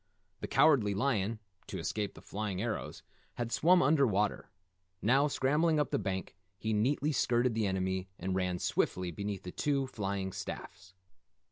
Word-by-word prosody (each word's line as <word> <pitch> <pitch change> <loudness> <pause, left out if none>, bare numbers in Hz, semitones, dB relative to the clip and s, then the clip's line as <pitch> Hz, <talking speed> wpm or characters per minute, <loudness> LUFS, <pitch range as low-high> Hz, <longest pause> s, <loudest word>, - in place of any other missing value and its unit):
The - - -4
Cowardly 115 -10 +4
Lion, 110 -2 0 0.3
to - - -5
escape 105 -2 -3
the - - -13
flying 100 -2 -3
arrows, 110 +1 -4 0.3
had 120 -1 -3
swum 175 +7 +5
under 140 0 +4
water. 105 -1 0 0.5
Now, 135 +8 +3
scrambling 150 +4 +2
up 145 - 0
the - - +1
bank, 95 -1 -3 0.2
he 110 +2 -2
neatly 135 +8 +1
skirted 120 -3 +2
the 110 -2 +1
enemy 95 0 -1
and 95 +2 -3
ran 90 -1 0
swiftly 90 0 0
beneath 100 +2 -4
the 90 - -6
two, 140 +3 0
flying 100 -5 -3
staffs. 95 +1 -8
105 Hz, 155 wpm, -32 LUFS, 95-135 Hz, 0.5 s, swum